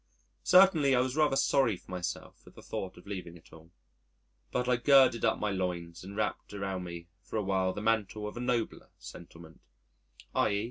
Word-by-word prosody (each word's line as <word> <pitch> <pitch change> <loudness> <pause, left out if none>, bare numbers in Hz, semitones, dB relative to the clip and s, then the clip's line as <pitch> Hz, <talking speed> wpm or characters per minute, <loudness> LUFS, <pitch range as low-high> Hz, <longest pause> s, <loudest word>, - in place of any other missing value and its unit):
Certainly, 180 -7 +6
I - - +3
was 130 +1 0
rather 150 -3 +3
sorry 135 -6 +2
for - - -16
myself 90 -1 -5
at - - -16
the - - -13
thought 95 -1 -5
of 90 - -15
leaving 90 -4 -7
it 85 - -20
all. 80 0 -15 0.8
But 125 - -1
I 125 -1 +3
girded 130 -2 +5
up - - +2
my 105 -1 -1
loins 90 -3 -4
and 100 +2 -9
wrapped 105 -1 -3
around 95 -2 -4
me 85 -1 -8
for 105 - -9
a 105 - 0
while 95 -1 +1
the 105 - -6
mantle 105 -1 0
of 105 - -8
a - - -6
nobler 120 -2 -2
sentiment; 85 -2 -13 0.7
_i. 100 -1 +2
100 Hz, 190 wpm, -30 LUFS, 90-125 Hz, 0.8 s, Certainly